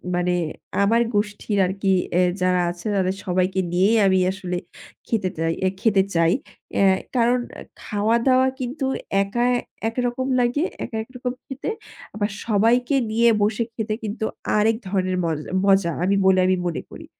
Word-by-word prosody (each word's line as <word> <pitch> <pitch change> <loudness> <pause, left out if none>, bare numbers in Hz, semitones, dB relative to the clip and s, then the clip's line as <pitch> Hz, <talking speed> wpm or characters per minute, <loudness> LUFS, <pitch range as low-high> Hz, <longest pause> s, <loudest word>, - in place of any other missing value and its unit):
মানে 180 0 +1 0.5
আমার 230 +4 +3
গোষ্ঠীর 205 0 -1
আরকি 195 +1 -1 0.2
এ্যা 180 - +4 0.2
যারা 180 -1 +2
আছে 175 +2 -12
তাদের 190 0 +1
সবাইকে 185 0 0
নিয়েই 200 +6 +4
আমি 190 0 +3
আসলে 180 -2 -4 0.5
খেটে 200 -5 0
চাই, 165 0 0 0.3
খেতে 200 -4 +4
চাই। 165 +1 +4 0.4
অ্যা 200 - +4 0.3
কারণ 245 +1 +3 0.4
খাওয়া-দাওয়া 235 +5 +2
কিন্তু 260 +2 -3 0.4
একা 240 +5 -1 0.4
একরকম 245 +2 -2
লাগে, 245 +5 +1 0.2
একা 225 -2 -5
একরকম 250 +1 -5
খেতে। 270 +8 -5 0.5
আবার 210 0 -1 0.2
সবাইকে 235 +5 +2 0.2
নিয়ে 235 +1 +4
বসে 215 +3 +1
খেতে 220 -2 -3
কিন্তু 220 +1 -3 0.3
আরেক 220 +1 +3
ধরনের 185 -1 0
মজ 160 -2 -1 0.3
মজা 195 -3 +4
আমি 195 +2 +2
বলে 190 -1 +5
আমি 185 0 +2
মনে 170 - -3
করি। - - -10
205 Hz, 145 wpm, -22 LUFS, 185-235 Hz, 0.5 s, বলে